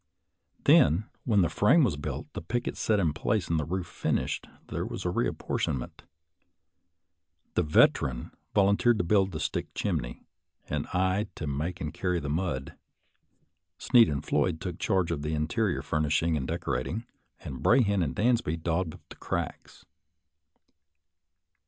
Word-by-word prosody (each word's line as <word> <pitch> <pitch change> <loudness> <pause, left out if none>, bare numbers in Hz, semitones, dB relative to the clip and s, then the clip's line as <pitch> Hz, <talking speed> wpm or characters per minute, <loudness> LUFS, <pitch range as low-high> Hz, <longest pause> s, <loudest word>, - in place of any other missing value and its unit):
Then, 85 +8 +5 0.2
when 105 -6 +4
the - - +3
frame 140 +11 +4
was 120 - +2
built, 75 - -5
the - - -5
pickets 120 +9 -3
set 105 -2 +2
in 80 -6 +1
place, 100 +3 -1
and 80 -1 +2
the 75 - -2
roof 90 +3 -2
finished, - - -2 0.2
there - - -2
was - - -5
a - - +1
reapportionment. 60 -3 -2 1.5
The - - +2
Veteran 70 -5 +2 0.2
vol 100 -1 +5
unteered 120 +1 +3
to 90 - +1
build 95 +1 +2
the 80 - -5
stick - - -2
chimney, 75 -12 -2 0.4
and - - -2
I 95 +3 0
to 75 - -5
make 75 +5 -3
and 75 -1 -3
carry 90 -2 -1
the 70 - -5
mud 75 -5 -2
(mortar); - - -19 1.0
Sneed 120 -3 +5
and 70 -2 -3
Floyd 80 - +1
took 90 -3 -5
charge 95 -5 +1
of 75 -3 -2
the 75 +1 -2
interior 80 0 0
furnishing 75 +2 +1
and 65 -4 -2
decorating, 85 - -2 0.4
and 65 -2 -7
Brahan 100 -6 +4
and 80 - -1
Dansby 115 -8 +1
daubed 85 0 -1
up - - -16
the - - -12
cracks. - - -5
85 Hz, 155 wpm, -28 LUFS, 75-100 Hz, 1.5 s, Then